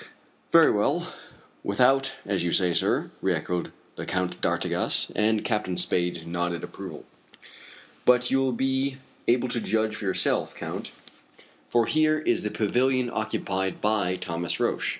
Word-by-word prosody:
"Very - - +7
well - - 0 0.5
without, 135 +6 +3
as 100 -2 0
you 85 - 0
say, 90 -2 +3
sir," - - +1
re - - +2
echoed 90 -1 -3 0.3
the - - -4
Count 90 -1 -2
d'Artigas, - - 0
and 110 0 +2
Captain 105 -6 -1
Spade 90 -1 0
nodded 85 0 -2
approval. - - -8 1.0
"But 125 0 +4
you 135 - +3
will 135 -1 +1
be 130 +2 0 0.3
able 125 +1 +3
to 120 - -2
judge 110 -1 0
for 105 - -6
yourself, 95 - +1
Count, - - -6 0.8
for 120 -1 +3
here 155 +4 +3
is 155 - +1
the 105 - -2
pavilion 125 +4 +1
occupied 95 -3 -2
by 105 -4 +1
Thomas 85 -2 -2
Roch. - - 0
110 Hz, 145 wpm, -26 LUFS, 90-125 Hz, 1.0 s, Very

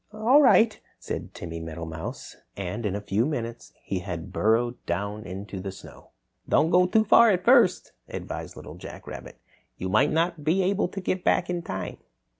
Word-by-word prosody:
"All 225 +7 +4
right," 230 -5 +5 0.2
said - - -6
Timmy 85 -1 -6
Meadowmouse, 80 0 -7 0.2
and 100 +4 -3
in 100 - -2
a 100 - -3
few 105 +2 0
minutes 120 -5 -4
he 95 - -2
had 85 -3 -6
burrowed 120 +3 +1
down 100 +5 -3
into 95 +2 -6
the 95 +1 -5
snow. 95 - -14 0.4
"Don't 160 - +3
go 180 0 +5
too 220 +4 +3
far 230 +2 +6
at 180 -3 +1
first," 235 -7 +4 0.2
advised - - -6
Little - - -10
Jack - - -10
Rabbit. - - -9 0.4
"You 95 - -4
might 145 +10 +4
not 165 0 0
be 170 +6 +2
able 195 +1 +1
to 195 +2 -6
get 185 0 -2
back 175 - +2
in 175 -1 -2
time." 95 - -5
120 Hz, 180 wpm, -26 LUFS, -, 0.4 s, far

